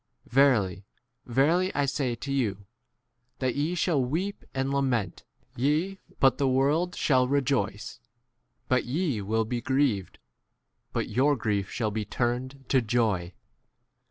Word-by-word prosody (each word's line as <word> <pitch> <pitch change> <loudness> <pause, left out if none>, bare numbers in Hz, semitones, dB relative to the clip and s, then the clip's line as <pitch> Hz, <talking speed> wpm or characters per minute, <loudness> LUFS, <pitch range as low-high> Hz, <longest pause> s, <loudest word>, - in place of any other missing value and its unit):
Verily, 110 -8 +3 0.4
verily, 160 +10 +2
I 145 - +2
say 135 -3 -1
to 140 +4 -6
you, 105 -7 -1 0.7
that 130 -2 0
ye 150 +5 -1
snail 165 -6 +1
weep 175 +11 -2
and 135 +1 -1
lament, 125 -9 -1 0.3
ye, 155 +9 0 0.2
but 135 -1 +4
the 140 - +2
world 145 +7 +2
shall 130 -3 +3
rejoice; 125 -7 -1 0.7
but 130 -1 +2
ye 145 - -1
n 100 - -7
will 110 +1 +1
be 120 +2 -3
grieved, 130 -6 0 0.7
but - - -2
your 135 +6 +3
grief 105 -5 -1
shall 110 -3 -2
be 110 +1 -2
turned 130 +4 -3
to 130 - +4
21 115 - -10
joy. 105 -7 +1
130 Hz, 140 wpm, -27 LUFS, 110-140 Hz, 0.7 s, but